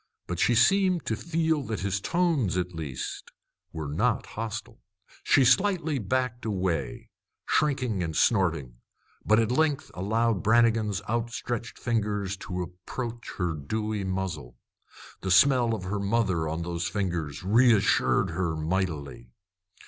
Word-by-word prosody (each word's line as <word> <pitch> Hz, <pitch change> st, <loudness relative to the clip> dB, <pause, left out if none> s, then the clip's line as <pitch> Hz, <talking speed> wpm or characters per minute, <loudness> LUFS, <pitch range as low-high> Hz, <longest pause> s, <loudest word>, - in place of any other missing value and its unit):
But 85 Hz, -1 st, -4 dB
she 120 Hz, -, +3 dB
seemed 185 Hz, -, +3 dB
to 110 Hz, -, 0 dB
feel 160 Hz, +2 st, 0 dB
that 110 Hz, -3 st, -3 dB
his 100 Hz, 0 st, -1 dB
tones, 150 Hz, -, +1 dB
at 90 Hz, 0 st, -2 dB
least, 75 Hz, -6 st, -6 dB, 0.4 s
were 80 Hz, -2 st, -5 dB
not 105 Hz, +12 st, 0 dB
hostile. 110 Hz, -1 st, -6 dB, 0.4 s
She 135 Hz, -, +4 dB
slightly 160 Hz, +2 st, +2 dB
backed 125 Hz, +3 st, -1 dB
away, 95 Hz, -7 st, -2 dB, 0.3 s
shrinking 130 Hz, -9 st, +1 dB
and 80 Hz, -2 st, -3 dB
snorting, 80 Hz, -, +1 dB, 0.5 s
but 110 Hz, -, +4 dB
at 115 Hz, 0 st, +1 dB
length 150 Hz, +1 st, +1 dB
allowed 110 Hz, +2 st, 0 dB
Brannigan's 110 Hz, -3 st, +2 dB
outstretched 120 Hz, 0 st, -3 dB
fingers 105 Hz, -4 st, -1 dB
to 90 Hz, -1 st, -4 dB
approach 115 Hz, +7 st, -7 dB
her 90 Hz, -3 st, 0 dB
dewy 105 Hz, +7 st, -3 dB
muzzle. 90 Hz, -10 st, -4 dB, 0.6 s
The 95 Hz, -, -3 dB
smell 120 Hz, +3 st, +5 dB
of 105 Hz, -, -7 dB
her 100 Hz, +3 st, -2 dB
mother 100 Hz, -6 st, 0 dB
on 80 Hz, +2 st, -3 dB
those 85 Hz, 0 st, -3 dB
fingers 85 Hz, -7 st, -3 dB
reassured 105 Hz, -3 st, +3 dB
her 85 Hz, -1 st, -1 dB
mightily. 80 Hz, -6 st, -3 dB
105 Hz, 130 wpm, -27 LUFS, 90-120 Hz, 0.6 s, smell